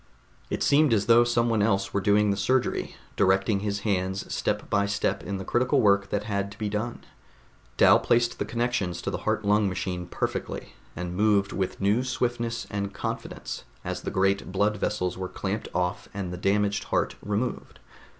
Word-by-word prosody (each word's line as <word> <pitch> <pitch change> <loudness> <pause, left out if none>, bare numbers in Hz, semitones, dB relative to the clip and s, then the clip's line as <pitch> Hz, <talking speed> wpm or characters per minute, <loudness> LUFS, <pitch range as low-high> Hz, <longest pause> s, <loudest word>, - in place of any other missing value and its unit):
It - - -1
seemed 145 -3 +4
as 105 -2 +2
though 115 0 +6
someone 120 -2 +2
else 100 -2 +1
were 100 - +1
doing 105 0 +3
the - - +1
surgery, 120 +6 0 0.2
directing 95 +2 +3
his 105 0 -2
hands 95 -2 -1
step - - -1
by 100 0 +1
step 100 0 0
in 100 - -4
the 95 - -6
critical 130 +3 +2
work 100 -3 +3
that 105 0 -1
had 100 -2 -2
to 100 - -12
be 105 -1 -2
done. 110 +3 -4 0.7
Dal - - +7
placed 120 0 +1
the - - 0
connections 115 -7 -1
to - - -2
the - - -3
heart 105 - 0
lung 105 0 +3
machine 90 -1 -3
perfectly, - - -4 0.2
and 90 +1 -4
moved 100 -1 +3
with 95 -2 -2
new 105 +5 +2
swiftness 120 -2 -2
and 100 -1 -3
confidence - - -5 0.2
as - - -4
the - - -3
great 95 0 +1
blood 105 +2 +1
vessels 90 -3 -2
were 95 -1 -3
clamped 100 +2 -3
off 90 0 -2
and 95 -3 -4
the - - -3
damaged 100 +3 +1
heart - - 0
removed. 105 +5 -3
100 Hz, 180 wpm, -26 LUFS, 95-115 Hz, 0.7 s, Dal